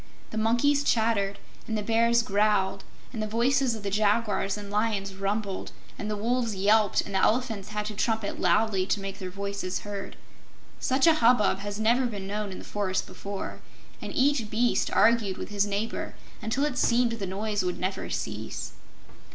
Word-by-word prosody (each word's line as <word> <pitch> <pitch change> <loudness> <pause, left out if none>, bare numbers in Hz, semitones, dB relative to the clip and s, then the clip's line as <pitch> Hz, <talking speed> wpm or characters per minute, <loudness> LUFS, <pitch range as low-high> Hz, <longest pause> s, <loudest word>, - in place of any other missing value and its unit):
The 220 - -4
monkeys 240 +6 +3
chattered 220 -5 +1 0.3
and 220 - -1
the 210 - -2
bears 230 +2 +3
growled 200 -2 +1 0.3
and 220 - -3
the 215 - -1
voices 240 +3 +2
of 215 - -8
the 200 - -2
jaguars 205 -1 +1
and 205 -1 -8
lions 205 -2 0
rumbled, 195 0 -3 0.2
and 210 - -5
the 210 - -2
wolves 230 0 0
yelped 205 +2 +3
and 200 - -8
the 190 - +2
elephants 225 -2 +1
had 210 0 -3
to 215 - -4
trumpet 220 0 -1
loudly 190 +1 +2
to 205 - +1
make 195 0 -6
their 185 -2 -5
voices 200 -1 -4
heard. 205 -1 -6 0.6
Such 265 +1 +2
a 330 - +7
hubbub 235 -8 +4
had 205 0 -4
never 235 +4 +3
been 205 -4 -6
known 205 0 -3
in 185 - -7
the - - -9
forest 195 -2 -1
before, 200 -1 -6 0.4
and - - -5
each 265 -5 +2
beast 235 +3 +1
argued 225 -4 +3
with - - -6
his 205 0 +1
neighbor 205 +3 -3 0.3
until 240 +6 0
it 280 -4 -2
seemed 235 0 +3
the 220 -4 -3
noise 205 +2 -1
would 180 -1 -2
never 185 +1 -3
cease. - - -4
210 Hz, 180 wpm, -27 LUFS, 200-230 Hz, 0.6 s, a